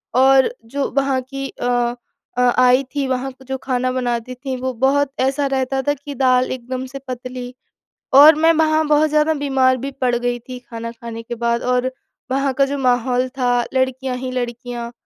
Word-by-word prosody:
और 265 - +5
जो 275 +4 -2
वहाँ 270 -1 +2
की 275 +1 -6
अ 245 0 -1 0.4
अ, - - +2 0.2
आई 255 +2 +5
थी 275 -2 0
वहाँ 260 +1 -2 0.2
जो 265 0 -2
खाना 255 -1 -1
बनाती 245 -1 -2
थी, 260 +1 -5
वो 255 0 -3
बहुत 270 +3 +1
ऐसा 270 +2 +1
रहता 265 0 -1
था 290 - +4
कि 285 +1 -9
दाल 255 0 +2
एकदम 255 +1 -4
से 275 +1 -8
पतली 250 0 -6 0.6
और 295 +2 +9
मैं 325 +2 +4
वहाँ 315 0 +2
बहुत 300 +1 +3
ज़्यादा 305 +1 +2
बीमार 265 -3 +2
भी 270 +3 -4
पड़ 245 -1 +2
गई 245 0 -1
थी 250 +2 -9
खाना 230 -1 -7
खाने 230 -1 -8
के 240 - -6
बाद 235 0 0
और 250 +1 +1 0.4
वहाँ 275 0 +1
का 275 +1 +3
जो 280 +1 -3
माहौल 250 0 +1
था 250 -1 +1 0.2
लड़कियाँ 260 0 0
ही 255 0 -4
लड़कियाँ 240 -1 -4
255 Hz, 185 wpm, -19 LUFS, 245-275 Hz, 0.6 s, और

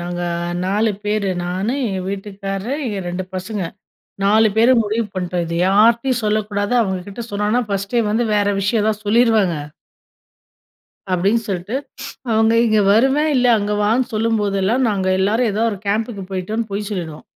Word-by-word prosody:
நாங்க 175 0 -4 0.4
4 210 +4 +1
பேரு. 210 -1 0 0.2
நானு 190 +8 -2
எங்க 190 -2 -2
வீட்டுக்கார்ரு, 195 +3 -4 0.2
என் 190 -3 -4
2 180 +1 -3
பசங்க. 190 +2 -4 0.6
4 215 +2 +5
பேரு 235 +3 +5
முடிவு 220 +1 -1
பண்ணிட்டோம். 180 -1 -2
இது 170 +1 -3
யார்ட்டயும் 230 +5 +3
சொல்லக்கூடாது 210 +1 0
அவுங்கக்கிட்ட 195 +2 -3
சொன்னோனா 210 +4 +1
ஃபர்ஸ்ட்டே 200 +4 0
வந்து 230 +3 +1
வேற 205 -1 +2
விஷயம் 210 +2 +1
எதா 220 - +3
சொல்லிருவாங்க. 215 -5 +3 1.6
அப்பிடின்னு 200 +6 +2
சொல்ட்டு, 190 +5 -3 0.5
அவுங்க 220 +1 +3
"இங்க 215 -1 +3
வருவே 270 +7 +3
இல்ல, 250 - +3
அங்க 205 0 -2
வான்னு" 230 +5 +1
சொல்லும்போதெல்லாம் 215 +1 +1
நாங்க 190 -2 -1
எல்லாரும் 220 +4 +2
எதோ 215 +3 0
ஒரு 200 - -6
கேம்புக்கு 210 -1 -2
போயிட்டோன்னு 210 +4 -3
பொய் 200 +1 -3
சொல்லிடுவோம். 165 -6 -5
210 Hz, 140 wpm, -19 LUFS, 195-225 Hz, 1.6 s, 4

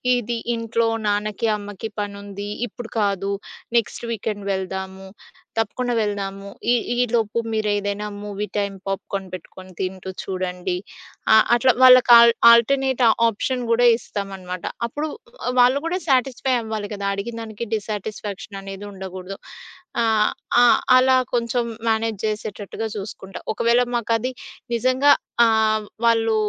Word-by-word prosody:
"ఇది 240 -1 -2 0.2
ఇంట్లో 230 0 0 0.2
నాన్నకి, 210 +2 0
అమ్మకి 205 +1 -7
పనుంది. 200 0 -6 0.2
ఇప్పుడు 230 +2 -10
కాదు. 200 -1 0 0.5
నెక్స్ట్ 235 +1 -1
వీకెండ్ 205 -2 -4
వెళ్దాము. 190 0 -5 0.5
తప్పకుండా 245 +3 -1
వెళ్దాము. 200 -1 -3 0.2
ఈ - - +5 0.2
ఈ - - -4 0.2
లోపు 225 -1 +1 0.2
మీరేదైనా 205 -1 -1 0.2
మూవీ 205 0 -4
టైమ్ 200 -1 -1
పాప్‌కార్న్ 195 0 -3
పెట్టుకొని 185 +1 -10
తింటూ 190 0 -4
చూడండి." 185 -1 -3 0.6
అ - - +8 0.2
అట్లా 255 +2 +4
వాళ్ళకి 255 -1 +8
ఆల్ 235 0 +7 0.2
ఆల్‌టర్‌నేట్ 260 +2 +3 0.3
ఆప్షన్ 250 +3 -2
గూడా 240 +1 +5
ఇస్తామనమాట. 190 -5 -6 0.2
అప్పుడు 295 +6 -4 0.5
వాళ్ళు 250 +3 +5
గూడా 360 +3 -1
సాటిస్ఫై 260 0 +1
అవ్వాలి 220 -2 -4
కదా! 200 -1 -5
అడిగినదానికి 225 +1 -5
డిస్‌సాటిస్‌ఫాక్షననేది 205 -1 -6
ఉండగూడదు. 190 0 -7 0.6
ఆహ్, 220 -2 +3 0.3
ఆ! - - +7 0.3
అలా 260 0 +5 0.2
కొంచెం 240 0 0 0.2
మేనేజ్ 220 -2 0
జేసేటట్టుగా 215 0 -4
జూసుకుంటా. 195 -1 -7
ఒకవేళ 235 +2 +3
మాకది 235 +2 0 0.4
నిజంగా 255 +4 +3 0.3
ఆహ్, 220 -1 +2 0.2
వాళ్ళు 225 -1 +3
215 Hz, 115 wpm, -22 LUFS, 200-235 Hz, 0.6 s, అ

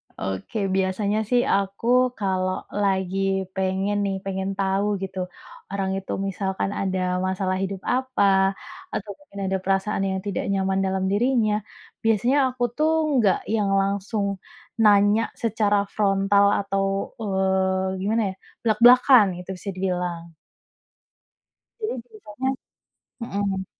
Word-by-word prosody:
Oke, 95 - -5 0.2
biasanya 200 +3 0
sih 245 -1 +4
aku 200 +3 -2 0.3
kalau 185 -2 0 0.3
lagi 190 -1 0 0.4
pengen 190 +2 0
nih, 195 -1 -1
pengen 190 0 -2
tahu 195 +1 +1 0.2
gitu, 190 0 -5 0.5
orang 195 -1 -1
itu 195 - -8 0.2
misalkan 195 0 -2
ada 190 -1 -1 0.3
masalah 185 0 -1
hidup 195 -1 -4
apa 260 -3 0 0.7
atau 210 - -4
mungkin 245 -9 -12
ada 190 0 0
perasaan 195 +1 0
yang 190 0 -1
tidak 195 - -2
nyaman 195 0 +1
dalam 190 0 -1
dirinya. 225 0 +2 0.5
Biasanya 225 +5 +2
aku 250 -1 -4
tuh 310 +1 +2 0.3
nggak 200 -4 +3 0.2
yang 205 -2 +1
langsung 200 +1 -1 0.6
nanya 205 +1 +5 0.2
secara 210 -2 +2 0.2
frontal 200 -1 +3
atau, 195 -1 -1 0.4
eee, 190 -1 0
gimana 220 +4 +1
ya, - - -12 0.3
blak-blakan 240 +1 +6
itu 180 - -11
bisa 190 +3 -7
dibilang. 180 -2 -3 1.5
Jadi 430 - -2
semisalnya 220 +2 -5 0.8
hmm. 195 -3 -2
195 Hz, 120 wpm, -24 LUFS, 190-215 Hz, 1.5 s, blak-blakan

